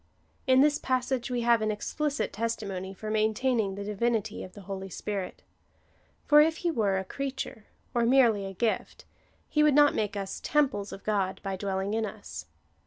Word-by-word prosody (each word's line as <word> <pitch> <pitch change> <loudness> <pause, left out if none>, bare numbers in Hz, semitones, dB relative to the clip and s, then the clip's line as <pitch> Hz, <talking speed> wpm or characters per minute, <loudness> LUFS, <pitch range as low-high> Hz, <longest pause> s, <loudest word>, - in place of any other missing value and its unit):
In 260 0 +6
this 295 +1 +4
passage 255 -1 -1
we 245 -1 -1
have 235 -1 +4
an 215 - 0
explicit 290 +7 -2
testimony 200 -4 -3
for 215 +3 -6
maintaining 220 -1 +1
the 200 - -5
divinity 210 +1 -1
of 185 - -10
the 205 - -11
Holy 195 0 -6
Spirit. 195 0 -5 0.8
For 300 0 +7
if 320 +1 +2
he 340 - +3
were 205 -9 +1
a 190 - -3
creature, 265 -2 -5 0.3
or 235 -1 +2
merely 235 -6 +4
a 195 - -7
gift, 220 +4 -2 0.4
he 300 - +1
would 300 -2 +5
not 290 0 +6
make 210 -1 -1
us 195 -1 -4
temples 260 -9 +1
of 195 - -9
God, 200 -3 0
by 195 -1 -2
dwelling 195 +1 -2
in 225 0 0
us. 80 - -8
215 Hz, 175 wpm, -28 LUFS, 195-260 Hz, 0.8 s, For